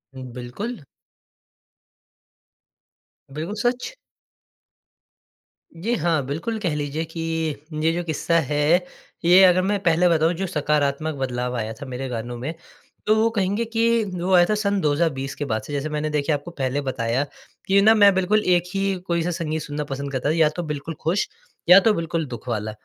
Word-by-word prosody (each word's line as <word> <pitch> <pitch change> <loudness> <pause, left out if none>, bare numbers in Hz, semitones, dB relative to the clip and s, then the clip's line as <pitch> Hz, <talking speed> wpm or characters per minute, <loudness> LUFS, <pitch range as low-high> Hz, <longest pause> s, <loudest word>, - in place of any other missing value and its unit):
बिल्कुल। 130 - -6 2.5
बिल्कुल 165 +8 -4
सच। 245 - -1 1.8
जी, 210 +9 -2
हाँ। 165 -3 +1
बिल्कुल 165 - -3
कह 180 -7 -1
लीजिए 150 +2 -2
कि 165 +1 -9 0.6
ये 160 - +4
जो 175 - -2
किस्सा 170 +1 0
है 145 - -1 0.7
ये 180 +3 +7
अगर 185 0 +6
मैं 200 +2 0
पहले 170 0 +4
बताऊँ 165 0 +3
जो 190 +3 -3
सकारात्मक 150 -1 0
बदलाव 125 -2 -2
आया 110 -1 -3
था 140 - -9
मेरे 130 0 -5
गानों 120 0 -5
में 135 +7 -4 0.5
तो 215 - +5
वो 220 +1 +3
कहेंगे 200 +4 +1
कि 230 0 +2
वो 180 +1 -1
आया 175 -1 +7
था 215 - +2
सन 200 -1 0
2020 145 -3 0
के 145 - -4
बाद 110 -5 -1
से। 145 - -8
जैसे 145 +2 -2
मैंने 150 0 -2
देखिए 150 +1 0
आपको 145 +4 -7
पहले 140 -2 -2
बताया 125 -1 -1 0.4
कि 200 +1 +5
ना 220 +2 +7
मैं 205 -2 +6
बिल्कुल 195 +3 +2
एक 175 -1 +3
ही 195 0 +1
कोई-सा 170 0 0
संगीत 160 -2 -3
सुनना 150 0 -4
पसंद 140 0 -5
करता, 130 +2 -1
या 160 -1 +4
तो 175 +3 -5
बिल्कुल 150 +1 -5
खुश, 175 +5 0 0.4
या 180 +2 +10
तो 215 +2 +3
बिल्कुल 165 -2 -2
दुःख 125 -2 -9
वाला। 110 -1 -2
160 Hz, 170 wpm, -23 LUFS, 140-185 Hz, 2.5 s, या